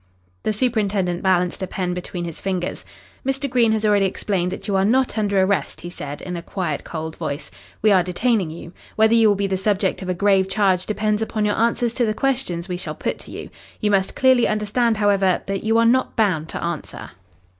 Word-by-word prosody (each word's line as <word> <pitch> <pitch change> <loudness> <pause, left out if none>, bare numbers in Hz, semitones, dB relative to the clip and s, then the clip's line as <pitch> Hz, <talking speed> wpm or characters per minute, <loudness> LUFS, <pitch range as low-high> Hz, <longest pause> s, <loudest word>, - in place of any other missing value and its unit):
The - - 0
superintendent 205 -6 0
balanced 180 -1 +1
a 190 - -2
pen 180 -1 -2
between 180 0 -5
his 165 -2 -7
fingers. 185 -2 -3 0.4
"Mr. 270 +1 -1
Green 240 -3 +3
has 220 0 0
already 205 -2 +4
explained 185 -2 -2
that - - -6
you 200 - 0
are 190 - +3
not 255 +5 +2
under 205 -3 +1
arrest," 190 +1 0
he 175 - -7
said, 145 -4 -7
in 180 -1 -5
a 170 - -4
quiet, 170 -4 -3
cold 160 -1 -6
voice. 150 -2 -5 0.3
"We 215 - +5
are 190 -2 +5
detaining 190 +1 0
you. 170 +2 -9 0.2
Whether 220 +1 +4
you 230 -1 +5
will 205 - +4
be 200 0 -1
the 190 -1 0
subject 195 0 0
of 185 - -5
a 180 - 0
grave 190 0 +3
charge 190 -2 +1
depends 215 0 0
upon 220 -1 -1
your 205 - +2
answers 235 +1 +1
to 240 0 +1
the 215 - -1
questions 245 -11 -1
we 180 -2 -3
shall - - -6
put - - -3
to - - -12
you. - - -8 0.3
You 210 -2 +1
must 195 -1 +1
clearly 260 -2 +4
understand, 215 +2 +1
however, 200 -3 +2
that 195 -1 -3
you 225 +1 +2
are 230 - +4
not 255 +3 +2
bound 180 -8 +1
to - - -5
answer." 170 -2 -5
200 Hz, 220 wpm, -21 LUFS, 180-220 Hz, 0.4 s, We